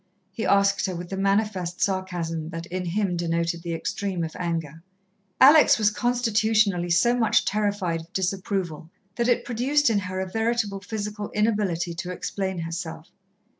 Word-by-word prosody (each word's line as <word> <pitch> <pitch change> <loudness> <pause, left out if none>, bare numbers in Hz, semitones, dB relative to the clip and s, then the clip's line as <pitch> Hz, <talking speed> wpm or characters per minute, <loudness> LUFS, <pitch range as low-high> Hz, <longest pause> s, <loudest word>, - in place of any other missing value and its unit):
he 220 +4 -3
asked 200 0 +3
her, 185 - -3
with 175 +1 -7
the - - -2
manifest 195 -3 0
sarcasm 175 -4 -2
that 165 -1 -6
in 180 +1 -4
him 185 +1 0
denoted 170 0 -1
the 170 -1 -3
extreme 185 +1 -3
of 160 - -5
anger. 165 -3 -3 0.6
Alex 295 +4 +7
was 210 -2 +3
constitutionally 215 -6 +1
so 205 +8 +3
much 230 -3 +2
terrified 205 -5 -1
of 165 +2 -16
disapproval 190 -4 -2 0.3
that 235 0 0
it 245 - +2
produced 255 +3 +2
in 210 - +2
her 185 -1 -4
a 190 - -2
veritable 225 -1 -1
physical 210 0 -5
inability 205 -6 0
to 175 +2 -5
explain 190 +1 -3
herself. 165 0 -6
190 Hz, 155 wpm, -25 LUFS, 170-215 Hz, 0.6 s, Alex